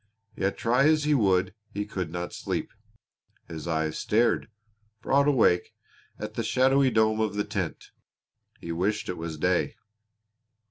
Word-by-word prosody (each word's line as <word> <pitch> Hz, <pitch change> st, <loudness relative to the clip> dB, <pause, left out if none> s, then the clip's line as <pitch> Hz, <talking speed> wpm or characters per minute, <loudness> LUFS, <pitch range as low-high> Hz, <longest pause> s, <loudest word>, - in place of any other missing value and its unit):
Yet 95 Hz, +1 st, -1 dB
try 125 Hz, +4 st, +2 dB
as 155 Hz, -1 st, +3 dB
he 150 Hz, 0 st, +2 dB
would 95 Hz, -7 st, +2 dB, 0.2 s
he 105 Hz, 0 st, -3 dB
could 95 Hz, -5 st, -4 dB
not 85 Hz, +1 st, -5 dB
sleep. -, -, -3 dB, 0.8 s
His 80 Hz, 0 st, -7 dB
eyes 80 Hz, -1 st, -1 dB
stared, 115 Hz, +1 st, +1 dB, 0.5 s
broad 140 Hz, +1 st, +3 dB
awake, 110 Hz, -11 st, +3 dB, 0.4 s
at 105 Hz, 0 st, -6 dB
the 115 Hz, -, -2 dB
shadowy 135 Hz, +3 st, +3 dB
dome 110 Hz, -2 st, +2 dB
of 110 Hz, -2 st, 0 dB
the 105 Hz, -, 0 dB
tent. -, -, -4 dB, 0.7 s
He 85 Hz, -, -6 dB
wished 95 Hz, +6 st, -1 dB
it 90 Hz, -, -3 dB
was 80 Hz, -1 st, -5 dB
day. 90 Hz, +3 st, +1 dB
105 Hz, 145 wpm, -27 LUFS, 90-120 Hz, 0.8 s, as